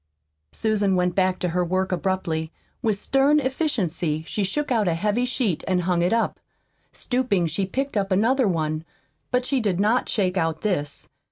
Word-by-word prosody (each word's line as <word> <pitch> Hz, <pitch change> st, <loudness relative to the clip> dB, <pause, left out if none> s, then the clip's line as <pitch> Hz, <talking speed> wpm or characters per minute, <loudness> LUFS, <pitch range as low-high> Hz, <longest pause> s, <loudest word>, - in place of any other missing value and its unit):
Susan 210 Hz, -, +1 dB
went 180 Hz, -1 st, +1 dB
back 185 Hz, -1 st, +2 dB
to 180 Hz, -, -1 dB
her 180 Hz, +2 st, 0 dB
work 185 Hz, +2 st, -1 dB
abruptly. 175 Hz, -4 st, -1 dB, 0.3 s
With 220 Hz, -4 st, +1 dB
stern 275 Hz, +7 st, +3 dB
efficiency 200 Hz, -, -1 dB
she 210 Hz, -, -1 dB
shook 290 Hz, +9 st, -2 dB
out 220 Hz, -5 st, +2 dB
a 170 Hz, -, +2 dB
heavy 210 Hz, +7 st, 0 dB
sheet 240 Hz, -, -1 dB
and 180 Hz, -2 st, +1 dB
hung 175 Hz, -1 st, +1 dB
it 175 Hz, -, +2 dB
up. 230 Hz, 0 st, 0 dB, 0.5 s
Stooping, 245 Hz, -8 st, 0 dB
she 175 Hz, +4 st, -1 dB
picked 270 Hz, +7 st, -3 dB
up 195 Hz, -1 st, 0 dB
another 230 Hz, +6 st, +3 dB
one. 155 Hz, -3 st, -1 dB, 0.5 s
But 250 Hz, 0 st, 0 dB
she 270 Hz, 0 st, +1 dB
did 200 Hz, -6 st, 0 dB
not 220 Hz, +5 st, +2 dB
shake 190 Hz, -4 st, 0 dB
out 165 Hz, -2 st, 0 dB
this. 145 Hz, -9 st, -2 dB
195 Hz, 175 wpm, -24 LUFS, 175-235 Hz, 0.5 s, stern